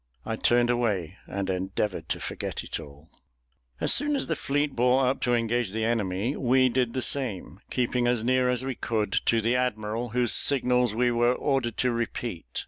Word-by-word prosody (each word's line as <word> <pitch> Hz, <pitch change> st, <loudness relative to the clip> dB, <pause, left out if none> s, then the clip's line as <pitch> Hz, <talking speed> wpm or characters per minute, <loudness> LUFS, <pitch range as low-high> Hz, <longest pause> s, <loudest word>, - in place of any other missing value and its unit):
I 110 Hz, -, -2 dB
turned 120 Hz, +1 st, +2 dB
away, 105 Hz, -9 st, -1 dB
and 100 Hz, -1 st, -3 dB
endeavoured 95 Hz, +1 st, -2 dB
to -, -, -2 dB
forget -, -, -5 dB
it -, -, -5 dB
all. 75 Hz, +2 st, -13 dB, 0.7 s
As -, -, +3 dB
soon 295 Hz, 0 st, +2 dB
as 270 Hz, -, 0 dB
the 160 Hz, -, -1 dB
fleet 145 Hz, 0 st, -1 dB
bore 125 Hz, +2 st, +3 dB
up 130 Hz, +2 st, 0 dB
to 120 Hz, -1 st, +2 dB
engage 115 Hz, -3 st, -1 dB
the 110 Hz, 0 st, -1 dB
enemy, 110 Hz, +2 st, -1 dB
we 130 Hz, 0 st, +3 dB
did 125 Hz, -1 st, 0 dB
the 130 Hz, -, -2 dB
same, 105 Hz, -, -1 dB
keeping 125 Hz, -1 st, 0 dB
as 120 Hz, -2 st, +1 dB
near 130 Hz, +1 st, +2 dB
as 125 Hz, +1 st, 0 dB
we 135 Hz, -, -2 dB
could 110 Hz, -4 st, -2 dB
to 115 Hz, -1 st, +3 dB
the 115 Hz, +3 st, +1 dB
admiral, 115 Hz, -1 st, -2 dB
whose 120 Hz, +1 st, +2 dB
signals 125 Hz, -4 st, +3 dB
we 120 Hz, +1 st, +2 dB
were 120 Hz, +1 st, +2 dB
ordered 130 Hz, -6 st, -1 dB
to 125 Hz, -, +1 dB
repeat. 115 Hz, -, -4 dB
120 Hz, 190 wpm, -26 LUFS, 110-125 Hz, 0.7 s, As